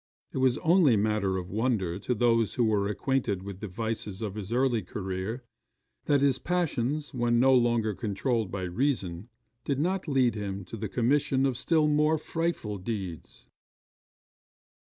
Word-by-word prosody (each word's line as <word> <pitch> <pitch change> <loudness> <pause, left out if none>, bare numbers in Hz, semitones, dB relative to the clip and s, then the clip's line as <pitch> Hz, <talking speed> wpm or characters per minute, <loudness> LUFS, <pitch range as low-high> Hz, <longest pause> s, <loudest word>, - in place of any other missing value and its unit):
It - - -2
is 130 -2 +3
only 160 -7 +5
matter 100 -2 +1
of 90 0 -6
wonder 105 -5 0
to 120 +5 -1
those 115 -1 +2
who 125 - +2
were 105 -3 +2
acquainted 105 -2 -1
with 100 -1 -7
the 110 - -5
vices 110 0 -4
of 105 -3 -3
his 105 -1 -6
early 125 -2 +2
career, 95 +5 -4 0.6
that 145 -2 +3
his 135 -2 +3
passions, 150 -4 -1
when 120 -2 +2
no 130 +2 +5
longer 120 -3 +2
controlled 110 +1 -1
by 95 +1 -4
reason, 95 -2 -2 0.3
did 140 - -1
not 180 +5 -1
lead 130 -5 +3
him 100 -2 -5
to 95 - -8
the 110 -1 -4
commission 130 +3 +2
of 135 -2 +1
still 155 +5 +2
more 150 +1 +3
frightful 155 - -3
deeds. 95 -5 -6
115 Hz, 155 wpm, -28 LUFS, 100-135 Hz, 0.6 s, only